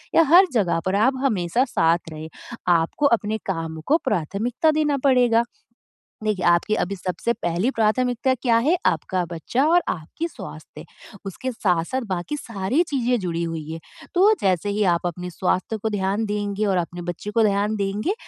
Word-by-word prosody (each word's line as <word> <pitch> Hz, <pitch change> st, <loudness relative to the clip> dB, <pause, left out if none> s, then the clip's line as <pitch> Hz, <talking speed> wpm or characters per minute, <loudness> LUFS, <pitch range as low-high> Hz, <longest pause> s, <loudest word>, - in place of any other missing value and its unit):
या -, -, +7 dB
हर 370 Hz, +3 st, +8 dB
जगह 195 Hz, -8 st, +1 dB
पर 190 Hz, +1 st, 0 dB
आप 230 Hz, +6 st, +3 dB
हमेशा 210 Hz, -1 st, +1 dB
साथ 165 Hz, -8 st, +1 dB
रहे। 155 Hz, 0 st, -7 dB, 0.4 s
आपको 170 Hz, -, +2 dB
अपने 215 Hz, +1 st, -3 dB
काम 165 Hz, -4 st, -3 dB
को 315 Hz, -, +5 dB
प्राथमिकता 225 Hz, -, 0 dB
देना 300 Hz, -2 st, +1 dB
पड़ेगा। 245 Hz, -4 st, +4 dB, 0.8 s
देखिए, 210 Hz, -4 st, -1 dB
आपकी 175 Hz, +5 st, +3 dB
अभी 200 Hz, -1 st, -2 dB
सबसे 185 Hz, +5 st, -2 dB
पहली 180 Hz, +4 st, -1 dB
प्राथमिकता 245 Hz, +3 st, +1 dB
क्या 245 Hz, -2 st, +1 dB
है? 340 Hz, +4 st, +4 dB
आपका 175 Hz, +3 st, 0 dB
बच्चा 175 Hz, -, -1 dB
और 350 Hz, +2 st, +4 dB
आपकी 170 Hz, -, -4 dB
स्वास्थ्य। -, -, -10 dB, 0.4 s
उसके 225 Hz, +7 st, -4 dB
साथ-साथ 190 Hz, +4 st, 0 dB
बाकी 180 Hz, +12 st, -3 dB
सारी 230 Hz, -, -1 dB
चीज़ें 250 Hz, -3 st, +1 dB
जुड़ी 170 Hz, -2 st, -2 dB
हुई 160 Hz, -2 st, -5 dB
है। 165 Hz, -, -6 dB, 0.3 s
तो 390 Hz, +4 st, +5 dB
जैसे 185 Hz, -1 st, +1 dB
ही 210 Hz, +1 st, 0 dB
आप 170 Hz, -, -3 dB
अपने 180 Hz, +1 st, -4 dB
स्वास्थ्य 185 Hz, +4 st, -1 dB
को 220 Hz, +1 st, -2 dB
ध्यान 200 Hz, +1 st, -1 dB
देंगे 205 Hz, 0 st, -2 dB
और 195 Hz, -2 st, +1 dB
अपने 175 Hz, 0 st, -4 dB
बच्चे 175 Hz, +4 st, -5 dB
को 225 Hz, +2 st, +2 dB
ध्यान 205 Hz, +1 st, +1 dB
देंगे 205 Hz, -, -1 dB
205 Hz, 165 wpm, -23 LUFS, 175-245 Hz, 0.8 s, हर